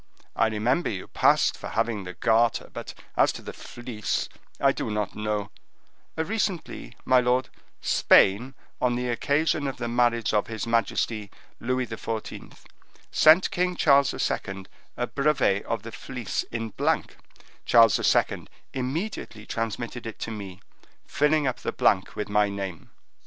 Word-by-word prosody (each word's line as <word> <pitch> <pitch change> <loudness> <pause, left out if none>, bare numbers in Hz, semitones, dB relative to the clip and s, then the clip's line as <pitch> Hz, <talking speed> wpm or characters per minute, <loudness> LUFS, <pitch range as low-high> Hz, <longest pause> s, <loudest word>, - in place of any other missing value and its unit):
I 115 - +3
remember 115 +9 0
you 95 -4 -4
passed - - +3
for - - -7
having 110 -3 -1
the 90 -1 -7
Garter; 115 +4 +2
but - - -7 0.2
as - - +4
to - - -9
the - - -7
Fleece, 120 -4 -4 0.3
I - - +4
do - - -4
not 105 -1 -2
know—" 105 -1 -2 0.7
"Recently, 185 +1 -2
my 130 -1 +5
lord, 125 +1 +1 0.3
Spain, 120 +8 +4 0.3
on 125 -1 +2
the 125 0 -2
occasion 145 +4 +1
of 135 - -4
the 120 - -3
marriage 115 -1 +1
of 105 -1 +2
his 110 0 -4
majesty 115 -2 0 0.3
Louis 130 +1 -1
XIV., 115 -1 -6 0.5
sent 160 +4 +6
King 180 0 0
Charles 140 -4 +4
II. 95 -1 -3 0.3
a - - 0
brevet 140 -9 +1
of 115 -3 -3
the 115 - -7
Fleece 125 -1 -4
in 115 -1 -3
blank; - - -1 0.5
Charles 115 -4 +6
II. - - +1 0.3
immediately 130 - -4
transmitted 115 +1 -4
it 115 - -7
to 115 - -3
me, 100 -3 -8 0.4
filling 150 0 +2
up 130 -2 -1
the - - -3
blank 95 -1 +1
with 105 - -3
my 105 0 +2
name." 95 -4 -6
115 Hz, 145 wpm, -26 LUFS, 105-130 Hz, 0.7 s, sent